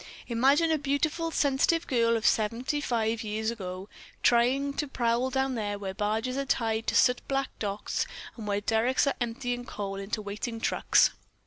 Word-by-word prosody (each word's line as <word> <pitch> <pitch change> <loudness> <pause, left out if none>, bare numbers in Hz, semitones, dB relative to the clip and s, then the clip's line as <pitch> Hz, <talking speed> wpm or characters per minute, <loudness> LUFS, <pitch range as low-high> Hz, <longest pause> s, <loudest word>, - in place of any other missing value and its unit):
"Imagine 275 +8 +3
a 315 - +2
beautiful, 305 +4 0
sensitive 310 +3 +2
girl 230 -2 +2
of 220 - -5
seventy 235 +7 +1
five 225 -4 0
years 220 +1 -2
ago 190 -3 -6 0.4
trying 260 +4 +3
to 295 - -2
prowl 245 -1 0
down 265 0 0
there 205 -3 -2
where 195 -2 -5
barges 220 +6 -1
are 275 - -1
tied 225 -4 0
to - - 0
soot 250 -1 +4
black 275 0 0
docks 205 -1 -2 0.3
and 220 -3 -7
where 205 0 0
derricks 225 +6 +2
are 280 - +2
emptying 245 +1 -2
coal 200 -4 -5
into 195 +3 -3
waiting 215 +3 -4
trucks. - - +3
235 Hz, 165 wpm, -28 LUFS, 215-270 Hz, 0.4 s, soot